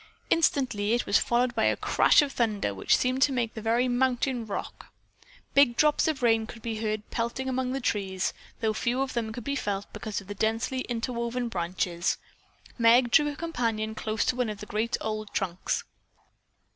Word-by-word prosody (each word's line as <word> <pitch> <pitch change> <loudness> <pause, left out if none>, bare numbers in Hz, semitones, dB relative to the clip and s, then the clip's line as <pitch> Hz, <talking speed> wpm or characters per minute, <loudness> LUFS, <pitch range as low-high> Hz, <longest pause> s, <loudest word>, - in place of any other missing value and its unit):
Instantly 250 -10 +2
it 240 - +1
was 200 - +4
followed 240 +1 +1
by - - +1
a - - +2
crash - - +4
of 285 - -3
thunder 215 - 0
which 95 - +2
seemed 255 +1 0
to 280 - +5
make 240 -4 -1
the 220 - -6
very 230 +3 +2
mountain 250 -1 0
rock. 200 - -6 0.6
Big 270 -4 +5
drops 300 0 +3
of 300 -5 -1
rain 225 -2 +3
could 230 -1 -11
be 225 -2 -3
heard 215 -1 -2
pelting 235 +3 -2
among 260 -1 -1
the 270 - -2
trees, 195 -6 -1 0.3
though 220 -1 +1
few 240 +4 0
of 270 - -5
them 230 -2 -2
could 240 +1 -7
be 280 +3 -2
felt 200 -6 -2
because 215 -2 -4
of 200 - -12
the 205 - -6
densely 225 +5 -1
interwoven 235 +1 -2
branches. 175 -2 -1 0.6
Meg 235 +1 +5
drew 295 -2 +5
her 290 - -5
companion 230 -9 -2
close 215 0 -2
to - - +1
one 250 -3 0
of 210 - -5
the 210 - -7
great 215 +3 -1
old 215 -1 -3
trunks. 185 -2 -1
230 Hz, 190 wpm, -27 LUFS, 215-255 Hz, 0.6 s, to